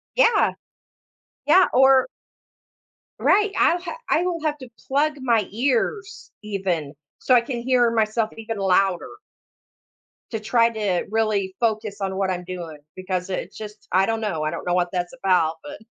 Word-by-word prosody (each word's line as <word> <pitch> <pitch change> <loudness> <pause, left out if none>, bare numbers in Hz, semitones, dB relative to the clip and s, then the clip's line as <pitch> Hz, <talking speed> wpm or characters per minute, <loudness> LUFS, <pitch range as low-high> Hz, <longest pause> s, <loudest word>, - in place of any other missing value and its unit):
Yeah. 480 -2 +4 0.9
Yeah, 360 +5 +6
or 265 +1 +5 1.1
Right, 415 +1 +3
I'll 345 - +3
ha 345 +5 -6
I 330 - +3
will 345 -3 -2
have 300 -1 -1
to 255 -2 -10 0.2
plug 295 +2 +1
my 235 -6 +1
ears 275 - -2
even, 185 -8 -2 0.2
so 255 - +1
I 245 - +6
can 240 0 -5
hear 245 -1 +3
myself 220 0 0
even 225 0 -5
louder 190 -1 +1 1.2
to 225 - -2
try 230 +2 +3
to 210 -6 -1
really 210 -4 0
focus 220 -3 -1
on 190 -1 -2
what 195 -1 0
I'm 180 -1 -3
doing, 175 -4 -7 0.2
because 185 0 -3
it's 185 0 -5
just 210 -1 -10
I 190 +1 +4
don't 225 +1 -1
know, 195 -8 -2
I 155 - -1
don't - - -6
know 175 - +1
what 180 0 +1
that's 175 -1 -3
about, 180 -4 +2
but 145 - -8
215 Hz, 160 wpm, -23 LUFS, 185-255 Hz, 1.2 s, Yeah